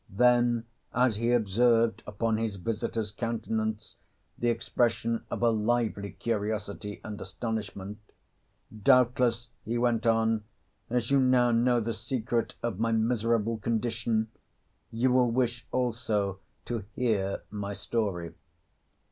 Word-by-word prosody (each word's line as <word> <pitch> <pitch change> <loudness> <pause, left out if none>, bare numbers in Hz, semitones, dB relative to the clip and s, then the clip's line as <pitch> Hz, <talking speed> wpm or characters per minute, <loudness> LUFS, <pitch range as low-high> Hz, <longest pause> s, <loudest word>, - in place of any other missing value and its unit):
Then 120 +1 +3 0.3
as 125 -3 +3
he 115 +2 +1
observed 115 0 +3
upon 110 +1 0
his 110 -2 -2
visitor's 110 +2 -2
countenance 110 -1 -3 0.4
the 120 - 0
expression 115 -1 0
of - - -3
a 120 - +5
lively 110 -2 0
curiosity 105 -2 -3
and 105 -1 -6
astonishment, 105 0 -5 0.8
"Doubtless," 125 -1 +3
he 115 +2 -2
went 120 -1 +1
on, 115 -1 +2 0.5
"as 120 +1 -1
you 140 - +5
now 125 -2 +4
know 120 +1 +3
the 115 0 -2
secret 120 0 -2
of 115 -5 -2
my 115 0 +1
miserable 115 0 +1
condition 115 0 -1 0.6
you 120 +3 +1
will 125 -1 +4
wish 120 0 -1
also 110 -6 0 0.3
to 115 -4 -3
hear 105 -6 0
my 100 -1 -4
story." 95 -4 -2
115 Hz, 120 wpm, -29 LUFS, 105-120 Hz, 0.8 s, a